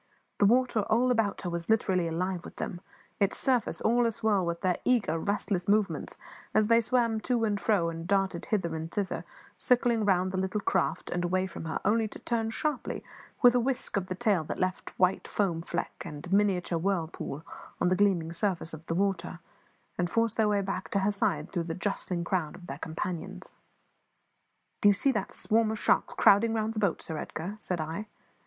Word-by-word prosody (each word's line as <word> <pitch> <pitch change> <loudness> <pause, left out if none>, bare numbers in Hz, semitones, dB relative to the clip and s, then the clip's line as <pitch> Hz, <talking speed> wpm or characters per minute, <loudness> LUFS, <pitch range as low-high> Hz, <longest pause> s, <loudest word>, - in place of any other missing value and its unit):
The 205 - +6
water 245 0 +3
all 245 +3 +3
about 225 -4 +1
her 180 - -3
was 170 +1 -4
literally 190 -5 +2
alive 180 +2 -2
with - - -10
them; 175 -4 -5 0.4
its 200 -1 +2
surface 255 -4 +1
all 235 +1 +3
a - - +1
swirl 210 -3 +1
with 170 0 -3
their 185 -1 +1
eager, 205 -10 +2
restless 200 -1 -1
movements 205 0 +1 0.4
as 215 0 +4
they 230 0 +6
swam 230 -1 +1
to 240 0 0
and 205 -2 0
fro 200 -6 +2
and 165 +1 -7
darted 195 -3 0
hither 180 -7 -1
and 160 +1 -5
thither, 200 -3 -2 0.3
circling 240 -2 +3
round 185 -2 +2
the 185 - -1
little 190 +2 -1
craft 185 -4 -1
and 175 0 -1
away 185 +2 +1
from 170 -3 -7
her, 160 - -2
only 220 +1 +3
to - - -9
turn 225 -2 -1
sharply, 295 +4 -3 0.4
with 245 -1 +8
a 250 - +3
whisk 255 +1 -1
of 195 -2 -1
the 185 - -3
tail 200 -5 +2
that - - -4
left 185 0 -2
a - - -19
white 185 0 +2
foam 180 -5 0
fleck 170 +1 -4
and 150 -3 -8
a 180 - -4
miniature 190 -4 +2
whirlpool 165 -4 -2 0.3
on - - +2
the 185 - +3
gleaming 180 -4 +2
surface 175 -3 -1
of 160 0 -8
the 165 - -1
water, 185 -2 -1 0.6
and 175 -1 +1
force 230 +3 +1
their 220 -2 +2
way 205 -1 +2
back 190 -1 -4
to 200 -4 +1
her 200 +2 +2
side 200 - -1
through 175 - -1
the 165 -1 -4
jostling 185 -2 -2
crowd 170 -3 -1
of 180 - -12
their 140 -4 -7
companions. 180 +3 -5 1.3
"Do 205 - +7
you - - +6
see 270 +7 +2
that 210 -6 -2
swarm 225 0 +2
of 220 - -2
sharks - - +1
crowding 225 +3 +5
round 220 0 -1
the 220 - -3
boat, 200 -5 0
Sir 160 -1 -4
Edgar?" 175 +8 -5
said 180 -4 -2
I. 160 +7 -4
195 Hz, 205 wpm, -29 LUFS, 175-220 Hz, 1.3 s, with